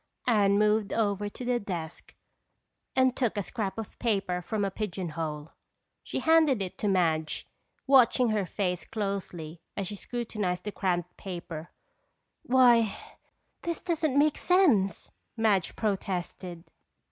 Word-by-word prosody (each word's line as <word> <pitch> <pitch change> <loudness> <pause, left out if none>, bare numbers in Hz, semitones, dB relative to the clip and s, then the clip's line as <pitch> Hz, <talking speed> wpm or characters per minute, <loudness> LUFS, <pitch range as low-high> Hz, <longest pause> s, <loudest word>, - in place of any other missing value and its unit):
Anne 205 -4 +4
moved 210 0 +2
over 205 -2 0
to 245 - -8
the 245 0 +1
desk 175 -6 -6 0.8
and 260 -1 +4
took 235 -5 0
a 205 - 0
scrap 210 -1 -3
of 225 -2 -7
paper 195 -6 0
from 205 +3 -1
a 195 - -2
pigeon 190 -3 -4
hole. 155 -1 -4 0.5
She - - -4
handed 320 -6 +4
it 190 -2 -4
to 210 - 0
Madge, 160 -5 +1 0.4
watching 255 -2 +5
her 210 -4 0
face 180 -2 -2
closely 180 -6 -4 0.2
as 200 - -1
she 205 - -5
scrutinized 210 -5 -3
the 210 - -4
cramped 180 -3 -2
writing. 170 -4 -6 0.7
"Why, 245 - +4 0.6
this 335 -1 -3
doesn't 320 -5 0
make 295 +1 +3
sense!" 255 - +3 0.3
Madge 205 -6 +2
protested. 185 -4 -3
205 Hz, 135 wpm, -28 LUFS, 180-240 Hz, 0.8 s, watching